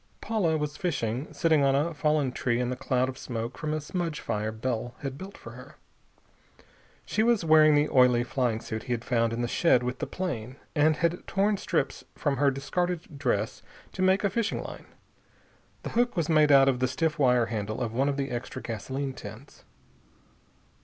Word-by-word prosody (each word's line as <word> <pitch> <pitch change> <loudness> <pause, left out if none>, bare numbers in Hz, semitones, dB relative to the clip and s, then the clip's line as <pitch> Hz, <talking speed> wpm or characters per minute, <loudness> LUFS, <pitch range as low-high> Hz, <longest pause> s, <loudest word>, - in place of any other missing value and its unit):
Paula 185 -8 0
was 150 -1 -3
fishing, 130 -6 -2
sitting 160 -3 +2
on 135 0 +3
a 155 +4 +1
fallen 150 -3 +1
tree 120 -1 -1
in 125 0 -1
the - - -2
cloud 130 0 0
of 130 0 -6
smoke 115 -1 -4
from 155 -2 -3
a 155 - 0
smudge 165 0 -3
fire 105 +1 -2
Bell 120 +1 -3
had 135 -1 -3
built 190 +7 -9
for - - -10
her. - - -12 1.3
She 220 - 0
was 225 -5 +2
wearing 155 -1 +6
the 145 +1 +3
oily 125 -3 +4
flying 120 -3 -1
suit 110 -1 -5
he 125 - -1
had 115 0 -4
found 115 -2 +1
in 115 +1 -2
the - - 0
shed 125 -2 +3
with 125 +1 -3
the - - -3
plane, 130 -10 -4 0.2
and 155 0 +3
had 170 +2 -1
torn 200 +1 +1
strips 165 -7 -1
from 145 -3 -1
her 140 +1 +4
discarded 160 +3 -3
dress 115 -4 -1 0.3
to - - -5
make 190 +2 +3
a 200 - +1
fishing 225 +1 -1
line. - - -9 1.0
The - - -5
hook 240 -3 +1
was 170 -2 0
made 155 -2 +5
out 135 -1 +7
of 130 -2 +2
the 130 - +2
stiff 155 +5 -1
wire 125 -3 +4
handle 110 -1 -3
of 115 -2 -2
one 135 +4 +1
of 140 - -2
the 140 -2 -2
extra 125 +1 -5
gasoline 130 +4 -4
tins. 115 +4 -11
140 Hz, 195 wpm, -28 LUFS, 125-160 Hz, 1.3 s, out